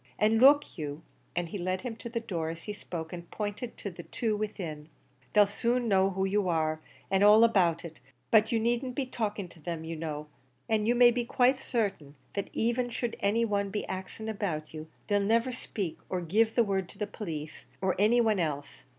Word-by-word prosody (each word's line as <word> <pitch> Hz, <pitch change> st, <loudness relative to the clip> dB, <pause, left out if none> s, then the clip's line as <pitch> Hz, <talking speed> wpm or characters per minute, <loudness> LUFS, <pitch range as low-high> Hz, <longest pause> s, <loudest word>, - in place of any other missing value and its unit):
An' 220 Hz, +1 st, +3 dB
look 280 Hz, -, +5 dB
you," 150 Hz, +1 st, -5 dB, 0.3 s
and 175 Hz, -1 st, -1 dB
he 200 Hz, -, -5 dB
led 185 Hz, +1 st, -1 dB
him 245 Hz, -3 st, -5 dB
to 235 Hz, -, -7 dB
the 230 Hz, 0 st, -2 dB
door 170 Hz, -8 st, -3 dB
as 165 Hz, 0 st, -7 dB
he 210 Hz, -, -4 dB
spoke, 165 Hz, -5 st, -6 dB
and 170 Hz, -1 st, -8 dB
pointed 210 Hz, +3 st, -4 dB
to 200 Hz, -, -5 dB
the 170 Hz, -, -9 dB
two 220 Hz, +4 st, -1 dB
within 175 Hz, -8 st, -5 dB, 0.4 s
"they'll 210 Hz, -1 st, +7 dB
soon 235 Hz, +4 st, 0 dB
know 195 Hz, -2 st, +4 dB
who 190 Hz, 0 st, -1 dB
you 195 Hz, -1 st, +1 dB
are, 155 Hz, -1 st, 0 dB, 0.3 s
an' 195 Hz, 0 st, +3 dB
all 210 Hz, +2 st, +8 dB
about 180 Hz, -7 st, +3 dB
it; 160 Hz, -2 st, -9 dB, 0.3 s
but 220 Hz, -1 st, +5 dB
you 230 Hz, -, +2 dB
needn't 240 Hz, +3 st, 0 dB
be 275 Hz, -, -1 dB
talking 210 Hz, -6 st, -3 dB
to 170 Hz, -, -16 dB
them, 165 Hz, 0 st, -4 dB
you 165 Hz, +1 st, -5 dB
know; 155 Hz, -2 st, -4 dB, 0.4 s
an' 215 Hz, -1 st, +1 dB
you 240 Hz, -, +3 dB
may 240 Hz, 0 st, +7 dB
be 240 Hz, 0 st, 0 dB
quite 250 Hz, +2 st, +3 dB
certain, 200 Hz, -, -2 dB, 0.2 s
that 200 Hz, -, -3 dB
even 240 Hz, +2 st, 0 dB
should 240 Hz, 0 st, -3 dB
any 220 Hz, +4 st, +2 dB
one 200 Hz, -2 st, 0 dB
be 210 Hz, +1 st, -3 dB
axing 190 Hz, +4 st, -6 dB
about 190 Hz, -9 st, -3 dB
you, 155 Hz, 0 st, -7 dB, 0.2 s
they'll 205 Hz, -1 st, +2 dB
niver 230 Hz, +5 st, +2 dB, 0.2 s
'peach, 190 Hz, -7 st, -2 dB
or 185 Hz, -, -1 dB
give 215 Hz, +7 st, +2 dB
the 235 Hz, -, +5 dB
word 195 Hz, -3 st, -1 dB
to -, -, -14 dB
the 210 Hz, -, -1 dB
police, 160 Hz, -7 st, -7 dB
or 190 Hz, -1 st, +1 dB
any 220 Hz, +4 st, +5 dB
one 220 Hz, -4 st, +3 dB
else. 145 Hz, -4 st, -3 dB
205 Hz, 210 wpm, -29 LUFS, 170-225 Hz, 0.4 s, all